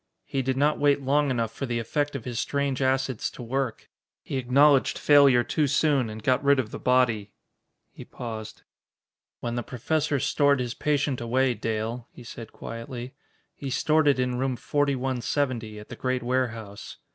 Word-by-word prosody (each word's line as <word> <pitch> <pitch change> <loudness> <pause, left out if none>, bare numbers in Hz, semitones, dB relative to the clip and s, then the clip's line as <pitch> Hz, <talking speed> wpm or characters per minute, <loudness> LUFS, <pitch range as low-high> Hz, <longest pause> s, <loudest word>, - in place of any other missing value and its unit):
He 135 - -2
did 130 0 -1
not 150 +2 +2
wait 145 -1 +3
long 145 +2 +2
enough 115 -3 -1
for 135 - -4
the 120 -1 -1
effect 145 +5 -1
of 125 - -5
his 120 -2 -3
strange 140 -2 -1
acids 130 -2 0
to 125 - -10
work. 130 0 -3 0.4
He 135 - -3
acknowledged 135 +2 +4
failure 140 -4 +6
too 150 +2 0
soon, 140 -3 +2
and 110 0 -8
got 130 +3 +2
rid 140 0 +5
of 110 -4 -2
the - - -6
body." 115 -5 +2 0.6
He - - -10
paused. 110 -2 -8 0.8
"When 120 - -3
the 120 - -1
Professor 145 +5 -1
stored 140 +1 +2
his 120 -2 -2
patient 145 -3 0
away, 125 +2 +1
Dale," 115 +2 -3
he 125 - -13
said 115 -1 -9
quietly, 120 +2 -7 0.4
"he 140 - -6
stored 155 +3 +2
it 140 - +4
in 125 -1 -1
room 130 -1 0
4170, 130 -4 -1
at 105 - -11
the - - -7
great 130 -1 -2
warehouse. 115 -5 -3
130 Hz, 170 wpm, -26 LUFS, 120-140 Hz, 0.8 s, failure